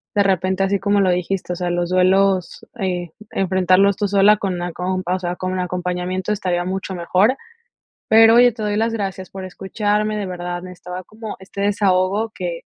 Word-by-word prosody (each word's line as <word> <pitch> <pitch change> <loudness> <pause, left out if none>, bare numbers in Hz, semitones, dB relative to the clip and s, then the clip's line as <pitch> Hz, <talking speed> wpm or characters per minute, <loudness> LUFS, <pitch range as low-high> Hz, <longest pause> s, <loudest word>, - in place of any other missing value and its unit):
de 205 - +4
repente, 190 0 +1
así 195 +1 +1
como 200 +1 +1
lo 185 -2 +3
dijiste, 180 +1 -2
o - - -4
sea, 180 0 -2
los 175 0 -1
duelos, 185 0 +2
eh, 180 -4 -2 0.2
enfrentarlos 190 +1 +3
tú 205 - 0
sola 200 +1 +5
con 195 -4 -2
la 175 -1 -4
compa 185 0 -2
o - - -3
sea, 175 -1 -3
con 185 0 -3
un 185 - -2
acompañamiento 180 +1 -2
estaría 180 -4 -1
mucho 190 +1 -4
mejor. 185 +8 +2 0.7
Pero, 225 +1 +7
oye, 245 +1 +7
te 225 -1 -7
doy 205 0 -1
las 225 +1 +1
gracias 195 -4 -4
por 190 -1 -7
escucharme, 210 +3 -1
de 205 - -3
verdad, 175 -1 -5
necesitaba 180 0 -8
como 215 +2 -8
este 190 +1 -8
desahogo 200 +1 +1
que, 175 -2 -4
190 Hz, 190 wpm, -20 LUFS, 180-200 Hz, 0.7 s, Pero